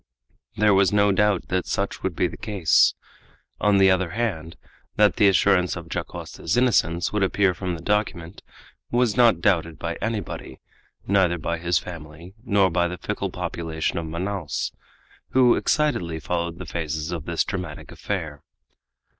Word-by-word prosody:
There 105 0 +4
was 95 0 +4
no 105 0 +4
doubt 100 -1 +1
that 90 -1 -1
such 100 0 -2
would 95 -3 -2
be - - +1
the - - -9
case. 100 -8 +3 0.6
On 105 -1 +3
the 95 -1 +6
other 95 -1 +1
hand, 85 -8 -3 0.4
that 105 -1 +3
the 105 - +5
assurance 95 -1 +3
of 85 -1 -8
Dacosta's - - -4
innocence 95 -9 +2
would 105 - 0
appear 95 0 +2
from 90 -1 -4
the 80 - -10
document, 100 -4 -2 0.5
was 120 -3 +1
not 115 -8 +4
doubted 85 -5 +1
by 85 0 -4
anybody, 105 - -4 0.5
neither 95 -3 +2
by 85 +1 -3
his 85 0 +1
family 85 -1 -8
nor 100 -6 +3
by 85 0 +2
the 90 +1 -5
fickle - - -3
population 80 -1 -3
of 80 - -5
Manaos, 85 0 -3 0.6
who 125 -2 +6
excitedly 90 - 0
followed 85 +1 -3
the - - -7
phases 80 -1 -4
of 85 -3 -5
this 85 -1 0
dramatic 90 -6 -6
affair. 80 -8 -5
90 Hz, 155 wpm, -24 LUFS, 85-100 Hz, 0.6 s, the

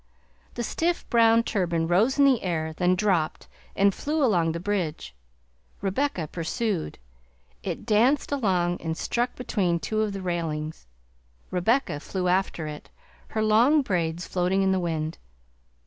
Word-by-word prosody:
The 240 - -2
stiff 340 +8 -1
brown 230 -1 +5
turban 170 -7 0
rose 210 +11 +3
in 285 - +6
the 265 -4 +4
air, 160 -3 -2
then 180 +2 +2
dropped 180 -5 0 0.3
and 200 0 +4
flew 300 +6 -1
along 175 -8 +2
the 170 - -4
bridge; 175 - -3 0.7
Rebecca 195 - -1
pursued; 170 - -3 0.6
it 180 +1 -5
danced 240 +8 +3
along 185 -10 0
and 160 0 -3
stuck 245 +1 -1
between 185 -9 0
two 215 +8 -1
of 215 -2 -1
the 195 -1 -5
railings; 160 - -3 0.6
Rebecca 185 - +1
flew 180 +4 -3
after 180 -3 0
it, 150 -1 -8 0.4
her 220 - -1
long 240 +8 +4
braids 170 -5 -1
floating 185 +2 +1
in 190 - +2
the 190 - +2
wind. 160 -2 -3
185 Hz, 145 wpm, -26 LUFS, 170-225 Hz, 0.7 s, in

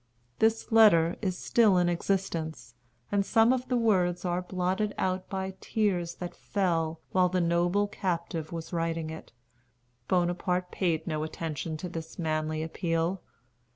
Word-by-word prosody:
This 225 +1 +2
letter 190 -7 +6
is 185 -4 -1
still 215 -6 +4
in 175 -1 +3
existence, 170 -6 -2 0.4
and 200 -1 +2
some 225 +4 +4
of 255 0 -2
the 250 - +1
words 185 -6 +2
are 175 0 0
blotted 185 +3 -1
out 185 0 -1
by 190 0 -3
tears 180 -6 0
that 175 -1 -6
fell 165 -5 -1
while 185 -1 +3
the 185 +1 0
noble 175 +4 +2
captive 170 -5 -3
was 165 0 -6
writing 165 -1 -1
it. 160 - -9 0.8
Bonaparte 180 0 0
paid 165 -4 0
no 155 -3 -2
attention 155 0 -4
to 180 - -5
this 165 -2 -7
manly 155 -1 -1
appeal. 165 +2 -1
175 Hz, 145 wpm, -29 LUFS, 165-195 Hz, 0.8 s, letter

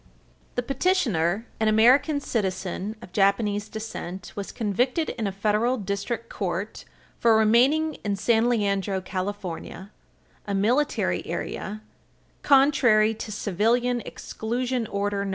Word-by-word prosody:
The 245 - 0
petitioner, 235 - +1
an 220 - +2
American 250 +7 +4
citizen 195 -3 -3
of - - -11
Japanese 205 +1 +1
descent, 210 -4 -7
was 200 -1 -5
convicted 245 - 0
in 225 -4 -3
a - - -2
federal 215 +5 +1
district 205 +3 -3
court 195 0 -4 0.3
for 230 -2 +5
remaining 260 +9 +4
in 205 -1 0
San 225 +4 +2
Leandro, 200 -4 0
California, 185 0 -5 0.6
a 200 - -1
"Military 245 +9 +1
Area," 215 +2 -5 0.6
contrary 260 -6 +4
to 220 0 -7
Civilian 235 +5 +1
Exclusion 240 +1 -3
Order 200 0 -1
No. 200 - -3
215 Hz, 115 wpm, -25 LUFS, 200-245 Hz, 0.6 s, for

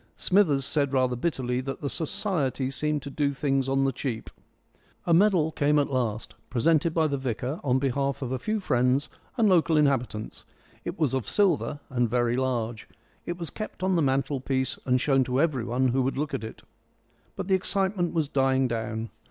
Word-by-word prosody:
Smithers 155 -9 +3
said 140 -2 +1
rather 130 -2 +2
bitterly 125 -3 -1
that 135 +1 -6
the 145 - -2
Society 145 - -1
seemed 150 +1 -1
to 140 - -7
do 140 0 0
things 135 -1 0
on 135 0 +2
the 135 - +2
cheap. 120 -3 -5 0.7
A 170 - +3
medal 175 -3 +4
came 150 0 +2
at 145 -1 +1
last, 115 -5 -2 0.2
presented 155 +6 +2
by 160 0 +2
the 140 -3 -1
vicar 130 +3 -3
on 130 -2 +2
behalf 140 +1 -1
of 125 - -4
a 130 - -2
few 215 - -1
friends 130 -4 +1 0.3
and 225 -3 +4
local 170 -4 +4
inhabitants. 130 -7 0 0.4
It - - -5
was 155 -6 +1
of 130 -3 -2
silver 170 -7 +1
and 120 -2 +1
very 120 0 +1
large. 120 -4 -2 0.4
It 175 - -3
was 170 -2 -4
kept 215 -4 -7
on 190 0 +2
the 170 - +3
mantelpiece 135 -1 0
and 125 0 +3
shown 135 0 +3
to 125 +1 0
everybody 130 -4 +1
who 130 +2 +1
would 135 +1 -1
look 150 0 -2
at - - -2
it. 110 - -8 0.7
But - - -5
the 195 - +2
excitement 190 -1 +1
was 160 -3 +1
dying 135 -2 +2
down. 110 -1 -3
135 Hz, 185 wpm, -27 LUFS, 125-155 Hz, 0.7 s, medal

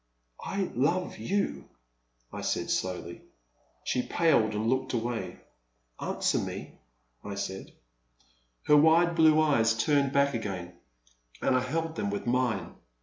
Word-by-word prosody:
I 195 -2 -2
love 170 +9 0
you,*' 200 +1 -2 0.6
I - - -5
said, - - -1
slowly. 90 -2 -3 0.6
She 125 - 0
paled 120 -10 +2
and 110 +2 -1
looked 130 +2 0
away. 120 0 -3 0.6
Answer - - 0
me," - - -6 0.4
I 100 - -6
said. 95 -1 -5 0.9
Her 150 - +5
wide 165 +3 +5
blue 160 -1 +5
eyes 115 -8 +3
turned 140 +3 +2
back 140 0 +2
again, 95 -6 -4 0.7
and 130 - +2
I - - +4
held 160 +5 -3
them 100 - -1
with 100 - -4
mine. 120 -4 0
130 Hz, 130 wpm, -29 LUFS, 110-155 Hz, 0.9 s, Her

